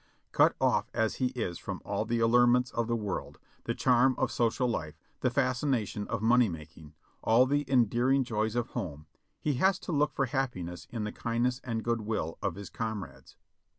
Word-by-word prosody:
Cut - - +4
off - - +2
as 110 -1 0
he 130 - +1
is 90 -8 -3
from - - -5
all 110 - -1
the 120 +1 0
allurements 120 +2 +4
of 115 -1 -1
the 120 - 0
world, 105 -4 -4 0.3
the - - -1
charm 130 +1 +4
of - - 0
social 120 +2 +1
life, 80 -10 -3 0.2
the 130 - +1
fascination 125 -5 0
of 110 -1 -3
money 120 0 +5
making, 80 -1 -10 0.3
all 115 +3 +5
the 145 +1 0
endearing 130 +2 +3
joys 110 -2 -1
of 120 -1 -1
home, 75 -4 -5 0.3
he 150 - 0
has 190 0 +4
to - - -5
look 150 -1 +2
for 135 - +1
happiness 120 -10 -3
in 115 -3 -4
the 105 - -3
kindness 120 +2 -1
and 115 -3 -3
good 115 -1 0
will 105 -7 -3
of 95 -4 -1
his 100 0 -9
comrades. 110 -3 -6
115 Hz, 185 wpm, -30 LUFS, 105-125 Hz, 0.3 s, money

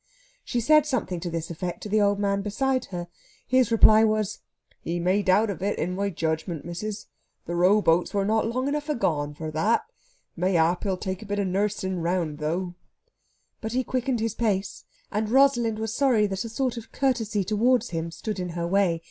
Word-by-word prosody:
She 245 - -2
said 305 +5 +4
something 215 - -2
to 175 - -4
this 165 0 -4
effect 175 +1 -5
to - - -5
the 215 +1 +3
old 200 0 +3
man 200 -1 0
beside 255 +5 0
her. 175 -2 -6 0.4
His 255 -2 +3
reply 220 -1 +7
was: 215 -2 0 0.4
"Ye 170 +1 -3
may 185 +4 +2
doubt 205 +3 +3
of 190 - -7
it, 200 +2 -1
in 180 +3 -2
my 200 +1 -1
judgment, 160 -2 -3
missis. 200 +5 -5 0.4
The 170 - -4
rowboats 180 -1 +3
were 200 -1 0
not 220 +2 +1
long 255 +3 -1
enough 295 +1 -2
agone 150 - -1
for 155 +1 -5
that. 200 +9 +1 0.5
Mayhap 175 0 +1
he'll 190 -2 0
take 190 -1 -4
a 215 - -9
bit 205 0 -2
of 200 - 0
nursing 190 -1 -1
round, 165 -3 -1
though." 175 +4 -2 0.9
But 220 0 -4
he 255 +1 +1
quickened 255 -2 -1
his 225 -1 -1
pace, 210 -4 -2 0.3
and 210 +1 -1
Rosalind 240 -4 +3
was 220 0 -3
sorry 250 -7 +3
that 195 +1 -3
a - - -5
sort 250 +1 -2
of 230 - -9
courtesy 230 -6 0
towards 230 +4 +2
him 165 0 -3
stood 195 +4 -5
in 180 -1 -3
her 170 - -1
way. 180 -2 +2
200 Hz, 195 wpm, -25 LUFS, 175-225 Hz, 0.9 s, reply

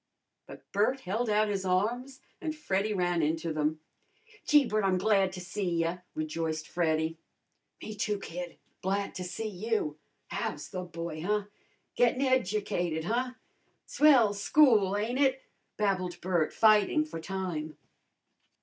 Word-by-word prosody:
But - - -12
Bert 220 +7 +1
held 220 +4 -1
out 215 +1 +3
his 200 -2 -2
arms 240 +9 -1 0.2
and 315 -1 -3
Freddy 210 -8 -1
ran 175 -3 +1
into 160 +1 -1
them. 155 +1 -1 0.7
"Gee, 295 -2 +6
Bert, 215 -2 0
I'm 190 -1 +2
glad 195 -1 +3
to 185 - -6
see 180 +2 -3
ya!" 165 +2 0 0.2
rejoiced 155 0 -3
Freddy. 160 -1 0 0.6
"Me, 215 - -5
too, 210 0 -1
kid, 180 -2 -7 0.2
glad 195 +2 -1
to 185 - -5
see 200 +5 -4
you! 205 -6 -2 0.3
How's 145 0 -4
the 185 - -4
boy, 170 -2 -6
huh? 210 +4 0 0.5
Gettin' 245 +2 +3
educated, 200 - 0
huh? 250 +7 -1 0.5
Swell 260 -9 +5
school, 205 -3 +4
ain't 235 +5 -1
it?" 265 -2 +2 0.3
babbled 185 -4 0
Bert, 175 -4 0
fighting 215 +7 +4
for 305 - -7
time. 165 -4 -4
195 Hz, 140 wpm, -30 LUFS, 170-220 Hz, 0.7 s, Gee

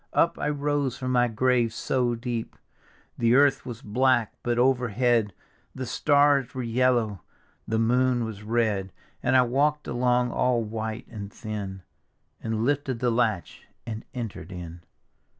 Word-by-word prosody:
Up 170 - +2
I 145 - 0
rose 145 -3 -1
from 130 -1 -3
my 125 -1 +3
grave 120 0 +2
so 120 +1 0
deep. 115 -1 -4 0.6
The 115 +1 +4
earth 140 -1 +4
was 120 -3 -7
black, 120 +1 +2
but 120 -1 -1
overhead 120 -3 +2 0.4
The 130 - -4
stars 140 -1 +3
were 130 - -2
yellow, 115 -5 +1 0.5
the 110 - 0
moon 125 +1 +2
was 110 -2 -7
red; 105 -3 0 0.3
And 130 - +3
I 130 - +6
walk'd 145 +5 +1
along 125 0 +1
all 125 -2 +1
white 110 +2 -5
and 100 -2 -8
thin, 100 -5 -6 0.6
And 110 0 -1
lifted 140 -2 0
the 120 +1 +1
latch 115 -6 -1 0.2
and 110 -2 -5
cnter'd 115 -5 -6
in. 85 -1 -8
120 Hz, 145 wpm, -26 LUFS, 110-130 Hz, 0.6 s, I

